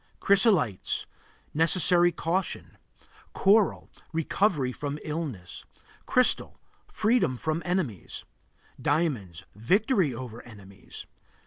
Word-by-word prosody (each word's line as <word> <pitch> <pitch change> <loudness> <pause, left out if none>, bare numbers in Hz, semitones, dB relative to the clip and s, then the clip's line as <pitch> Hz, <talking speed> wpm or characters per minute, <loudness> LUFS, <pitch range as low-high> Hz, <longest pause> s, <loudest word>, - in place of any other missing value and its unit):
Chrysolites 190 - +2 0.5
Necessary 175 +2 +4
caution. 175 +3 -3 0.6
Coral 205 +1 +3 0.2
Recovery 165 -3 0
from 145 +2 -5
illness. 150 - -5 0.4
Crystal - - +1 0.3
Freedom 215 - +1
from 155 +5 -2
enemies. 175 - -3 0.6
Diamonds 125 - -1
Victory 185 - +2
over 120 -1 -8
enemies. 100 -4 -12
155 Hz, 80 wpm, -27 LUFS, 120-185 Hz, 0.6 s, Necessary